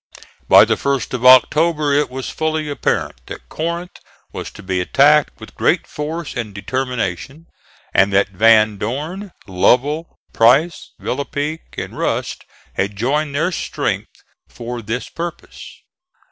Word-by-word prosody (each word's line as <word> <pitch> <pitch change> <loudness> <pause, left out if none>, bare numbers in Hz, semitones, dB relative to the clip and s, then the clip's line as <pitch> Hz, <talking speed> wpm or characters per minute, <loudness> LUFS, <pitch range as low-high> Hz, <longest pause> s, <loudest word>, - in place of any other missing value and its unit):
By - - +8
the - - +1
1st 140 -5 -2
of 125 0 +2
October 150 +3 +5
it 145 +1 +2
was 130 0 -6
fully 155 -1 -2
apparent 140 - -2
that - - -9
Corinth 170 +2 -4 0.3
was - - -6
to 105 - -12
be 95 -1 -1
attacked 145 +9 +3
with - - -12
great - - +1
force 155 +2 -5
and 110 -5 -5
determination, 125 - -3 0.5
and 100 +1 +4
that 100 +1 +2
Van 110 +1 +4
Dorn, 155 - -4
Lovell, 130 - +1 0.2
Price, 135 +9 +3
Villepigue 145 +4 -4
and - - -5
Rust - - -3 0.3
had 100 +1 -2
joined 140 +7 -1
their 165 +5 +1
strength - - -4 0.3
for 120 0 -6
this 115 +4 -4
purpose. 170 0 -8
135 Hz, 130 wpm, -19 LUFS, 115-155 Hz, 0.5 s, By